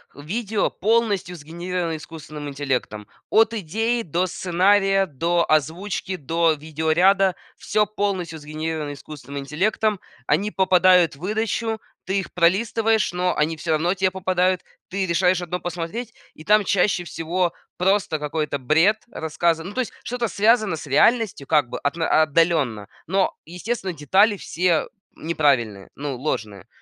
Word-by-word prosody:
видео 205 - -2
полностью 210 -4 0
сгенерированы 170 +1 -4
искусственным 155 -1 -9
интеллектом. 130 -7 -3 0.2
От 225 +1 +4
идеи, 225 +5 -1
до 175 +2 -1
сценария, 195 +2 +2
до 170 +4 0
озвучки, 180 +5 0
до 165 +3 +1
видеоряда- 160 +6 +2 0.2
всё 210 0 +1
полностью 190 -6 -2
сгенерировано 155 0 -4
искусственным 140 -1 -9
интеллектом. 195 +8 0 0.3
Они 195 +8 +1
попадают 185 -4 +4
в - - -19
выдачу, 220 +3 -1 0.3
ты 190 +1 0
их 195 - -6
пролистываешь, 220 +5 +2
но 180 0 0
они 160 +2 0
всё 160 +2 -3
равно 160 +3 +2
те 190 0 +1
попадают. 185 -1 +1 0.3
Ты 190 +1 -2
решаешь 180 +1 +2
одно 175 +1 -3
посмотреть, 175 +7 -5 0.2
и 155 - -12
там 210 +4 +4
чаще 185 -1 +1
всего 170 +2 -1 0.3
просто 185 -4 +1
какой-то 150 -1 -2
бред 160 - +3
рассказан. 165 +2 -1
Ну - - -9
то 255 - 0
есть 245 - -5
что-то 240 -1 -2
связано 215 -2 +2
с 155 - -8
реальностью, 185 - +2
как 150 -6 +2
бы - - -5
отно 160 +2 +2
отдаленно, 150 - +1 0.2
но 190 +2 +1
естественно 185 +3 -4
детали 190 +8 +3
все 175 -2 0 0.3
неправильные, 135 -11 0
ну 140 -1 -4
ложные. 110 - -4
175 Hz, 135 wpm, -22 LUFS, 155-195 Hz, 0.3 s, От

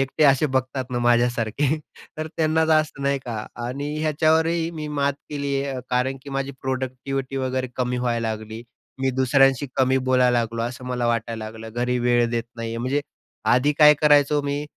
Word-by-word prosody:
एकटे 135 +3 +1
असे 140 +2 +5
बघतात 130 0 -1
ना 125 - -1
माझ्यासारखे, 120 +3 +1 0.4
तर 155 - -2
त्यांना 160 0 +2
जास्त, 155 -3 +2
नाही 140 0 +1
का? 110 -3 -5 0.2
आणि 145 +4 -4
ह्याच्यावरही 160 +2 +2
मी 155 -2 -6
मात 140 0 +2 0.2
केली 140 -1 -2
आहे. 135 -2 -4
कारण 125 +2 0
की 140 - -10
माझी 135 0 -2
प्रॉडक्टिव्हिटी 130 +1 -3
वगैरे 130 -1 -1
कमी 125 -1 -1
व्हायला 120 -2 -1
लागली. 110 +1 -6 0.4
मी 135 0 +1
दुसऱ्यांशी 135 +1 +3
कमी 130 0 +3
बोलायला 125 -1 +4
लागलो, 115 0 -2
असं 125 +2 -5
मला 125 -1 -1
वाटायला 115 -1 -2
लागलं. 110 +1 -8
घरी 125 +1 0
वेळ 120 -1 +2
देत 115 -1 -1
नाही 115 0 -4
आहे. 115 - -4
म्हणजे 130 +4 0 0.5
आधी 130 +5 +3
काय 150 0 +8
करायचो 145 -1 +4
मी, 145 +1 -2
130 Hz, 175 wpm, -23 LUFS, 120-145 Hz, 0.5 s, काय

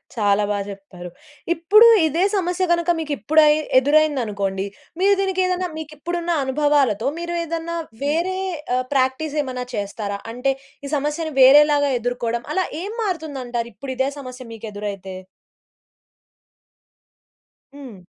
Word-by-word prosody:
చాలా 205 -2 +2
బాగా 205 -1 -1
జెప్పారు. 195 -3 -9 0.4
ఇప్పుడు 415 +8 +6 0.2
ఇదే 325 +4 +1
సమస్య 360 -1 0
గనుక 340 0 +1
మీకు 305 -2 -4
ఇప్పుడ 305 +10 +2 0.4
ఎదురైంది 290 0 +3
అనుకోండి. 195 -2 -2 0.3
మీరు 395 +1 +4
దీనికి 380 -1 0
ఏదైనా 365 0 -1
మీకు 310 -1 -7
ఇప్పుడున్న 345 +2 -3
అనుభవాలతో 270 -4 +1
మీరు 345 0 -4
ఏదన్నా 335 +1 -4 0.3
వేరే 335 +6 0 0.4
ఆహ్ 255 0 0
ప్రాక్టీస్ 270 +3 0
ఏమన్నా 255 -3 -5
చేస్తారా? 200 0 -4
అంటే 250 +3 0 0.3
ఈ - - -5
సమస్యని 300 +2 -2
వేరేలాగా 285 +1 +6
ఎదుర్కోవడం. 235 0 -2
అలా 375 +2 +1 0.2
ఏం 405 - -5
మారుతుంది 320 -9 -3
అంటారు 235 -1 -3
ఇప్పుడు 260 +6 -6
ఇదే 265 +1 +1
సమస్య 255 -1 -9
మీకు 225 0 -8
ఎదురైతే? 200 -2 -6 2.6
హ్మ్. 255 -9 -10
280 Hz, 130 wpm, -21 LUFS, 230-330 Hz, 2.6 s, ఇప్పుడు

